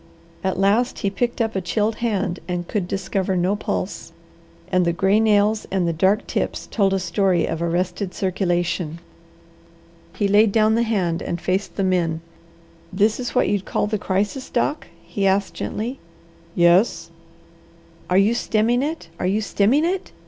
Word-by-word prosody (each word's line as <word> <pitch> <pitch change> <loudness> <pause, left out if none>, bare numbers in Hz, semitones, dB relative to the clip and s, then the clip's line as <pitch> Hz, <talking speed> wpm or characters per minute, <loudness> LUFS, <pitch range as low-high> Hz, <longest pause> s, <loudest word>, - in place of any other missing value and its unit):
At 190 0 -1
last 210 +6 +2
he 195 - +1
picked 240 +4 -1
up 225 -2 -1
a 190 - 0
chilled 210 +5 -1
hand 210 -6 -1
and 175 -1 -3
could 200 -5 -2
discover 190 0 -1
no 180 +3 +1
pulse, 205 - -4 0.6
and 185 -1 +3
the 170 -1 +1
gray 195 +4 +3
nails 215 0 +2
and 185 -2 0
the 170 - 0
dark 190 +6 +2
tips - - -2
told 195 -3 +2
a 195 - +1
story 185 -1 +1
of 165 0 -3
arrested 175 +3 -2
circulation. 175 -3 -1 1.2
He 205 - +1
laid 205 +1 +4
down 215 +1 +3
the 230 - +2
hand 185 -7 0
and 170 - -3
faced 185 +3 -2
the 195 - -1
men. 170 -4 0 0.7
"This 210 +4 +2
is 245 -1 -4
what - - +3
you'd 200 -2 0
call - - 0
the 210 0 -2
crisis, 205 +8 -2
Doc?" 290 +5 -1 0.2
he 195 +3 -1
asked 195 +1 +1
gently. 240 +5 -4 0.6
"Yes." 175 +4 +3 1.0
"Are 180 - +3
you 200 +4 +4
stemming 235 +1 +1
it? 300 - -3
Are - - 0
you 200 +3 +1
stemming 220 +8 +2
it? 370 +2 -2
195 Hz, 165 wpm, -22 LUFS, 180-220 Hz, 1.2 s, laid